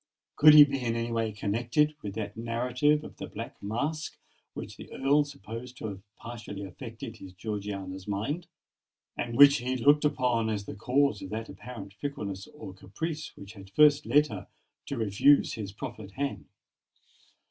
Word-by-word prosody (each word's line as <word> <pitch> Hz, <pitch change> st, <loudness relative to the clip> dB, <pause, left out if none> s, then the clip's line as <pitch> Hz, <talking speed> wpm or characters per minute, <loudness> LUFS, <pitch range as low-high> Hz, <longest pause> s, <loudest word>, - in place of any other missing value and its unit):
Could 150 Hz, 0 st, +8 dB
he 150 Hz, -, +12 dB
be 135 Hz, -2 st, -1 dB
in 115 Hz, -1 st, 0 dB
any 115 Hz, 0 st, -2 dB
way 115 Hz, -1 st, 0 dB
connected 115 Hz, +8 st, +1 dB
with 100 Hz, -1 st, -6 dB
that 110 Hz, -2 st, -4 dB
narrative 125 Hz, +6 st, +1 dB
of -, -, -11 dB
the -, -, -6 dB
Black -, -, -8 dB
Mask 145 Hz, +10 st, -3 dB, 0.4 s
which -, -, -7 dB
the -, -, -12 dB
Earl 145 Hz, +2 st, +3 dB
supposed 125 Hz, -1 st, -9 dB
to 110 Hz, -, -4 dB
have 95 Hz, -1 st, -8 dB
partially 110 Hz, -4 st, -8 dB
affected 115 Hz, +3 st, -8 dB
his 95 Hz, -3 st, -11 dB
Georgiana's 100 Hz, -2 st, -5 dB
mind, 115 Hz, -, -2 dB, 0.7 s
and 120 Hz, 0 st, -3 dB
which 140 Hz, +1 st, +9 dB
he 130 Hz, +1 st, -2 dB
looked 145 Hz, +5 st, +5 dB
upon 125 Hz, -6 st, +1 dB
as 105 Hz, -2 st, -2 dB
the -, -, -6 dB
cause 125 Hz, +1 st, +1 dB
of 95 Hz, -, -7 dB
that 110 Hz, +1 st, -5 dB
apparent 105 Hz, -5 st, -9 dB
fickleness 100 Hz, -7 st, -5 dB
or 150 Hz, -11 st, -10 dB
caprice 150 Hz, -, -5 dB
which 100 Hz, +2 st, -10 dB
had 95 Hz, -2 st, -12 dB
first 150 Hz, +6 st, +5 dB
led 145 Hz, +6 st, +5 dB
her 105 Hz, -9 st, -7 dB, 0.4 s
to 140 Hz, -, -3 dB
refuse 115 Hz, +6 st, +4 dB
his 105 Hz, -4 st, -5 dB
proffered 110 Hz, -3 st, -8 dB
hand? 140 Hz, +3 st, -3 dB
115 Hz, 170 wpm, -29 LUFS, 100-140 Hz, 0.7 s, he